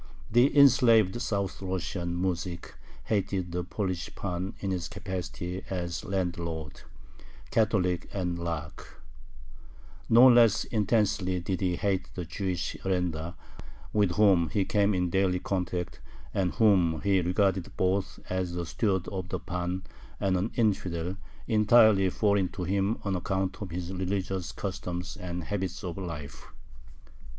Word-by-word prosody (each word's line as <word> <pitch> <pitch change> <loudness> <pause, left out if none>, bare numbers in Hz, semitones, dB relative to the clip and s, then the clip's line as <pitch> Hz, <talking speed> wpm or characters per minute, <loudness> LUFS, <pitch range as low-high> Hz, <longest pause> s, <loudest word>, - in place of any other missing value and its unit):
The 125 +5 +4
enslaved 120 -6 +6
South 100 -6 -2
Russian 90 -2 -3
muzhik 90 -1 -3 0.3
hated 95 -4 -1
the 90 +1 -2
Polish 90 +1 -3
pan 90 0 -3
in 100 - -2
his 90 -1 -2
capacity 90 -1 -5
as 85 -2 -3
landlord, 85 -5 -3 0.7
Catholic, 95 -5 +1
and 90 -3 -2
Lakh. 80 -4 -6 1.1
No 120 +3 +8
less 120 -3 +6
intensely 105 -4 +1
did 90 +2 -3
he 90 -2 +1
hate 95 0 -1
the 90 - -4
Jewish 90 +1 -3
arendar, 90 -3 -1 0.6
with 100 -4 +2
whom 95 -5 +4
he 100 +2 0
came 100 0 +2
in 90 -1 0
daily 95 -1 +2
contact, 90 -2 -3 0.3
and 95 -3 0
whom 90 -8 +4
he 95 0 +3
regarded 90 +1 +1
both 95 +1 0
as 90 -1 -2
a 85 -1 -2
steward 95 0 0
of 95 -2 -5
the - - -2
pan 90 +1 -3 0.4
and 95 -1 +1
an 95 +5 0
"infidel," 95 -5 0 0.3
entirely 110 -3 +5
foreign 100 -1 +1
to 95 -2 -4
him 100 +4 0
on 100 -2 -1
account 95 +1 -2
of 100 - -4
his 90 +2 -5
religious 95 -1 -2
customs 90 -2 -5
and 90 -1 -5
habits 95 -1 -3
of 90 -3 -4
life. 75 -6 -7
95 Hz, 135 wpm, -28 LUFS, 90-100 Hz, 1.1 s, No